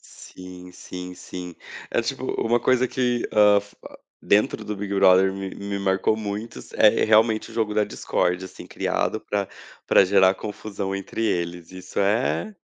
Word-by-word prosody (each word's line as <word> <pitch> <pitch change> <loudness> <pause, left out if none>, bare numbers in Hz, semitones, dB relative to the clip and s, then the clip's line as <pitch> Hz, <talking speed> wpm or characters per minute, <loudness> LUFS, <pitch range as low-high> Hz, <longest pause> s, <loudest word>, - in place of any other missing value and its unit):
Sim, 90 0 -13
sim, 90 0 -8
sim. 90 -1 -8 0.4
É - - +1
tipo - - -4
u - - -2
uma 120 +1 +3
coisa 130 +1 +2
que, 125 -2 -1
hã, 105 -1 +5
fa 100 0 -18 0.4
dentro 105 +1 +1
do 105 -1 -4
Big 100 0 -4
Brother 95 0 +5
me 95 0 -5
me 100 0 -5
marcou 100 +2 +1
muito 110 +2 -5
s - - -15
é, 110 +1 +5
realmente, 110 +1 +3
o 110 - -12
jogo 110 -2 -1
da 105 0 +2
discórdia, 90 -2 -1
assim, 95 - -12
criado - - -2
pra 100 -2 -3 0.4
pra - - +6
gerar 95 0 +4
confusão 100 -1 -5
entre 100 +3 -4
eles. 85 -4 -2
Isso 90 0 -8
é, 115 - 0
100 Hz, 170 wpm, -23 LUFS, 95-110 Hz, 0.4 s, pra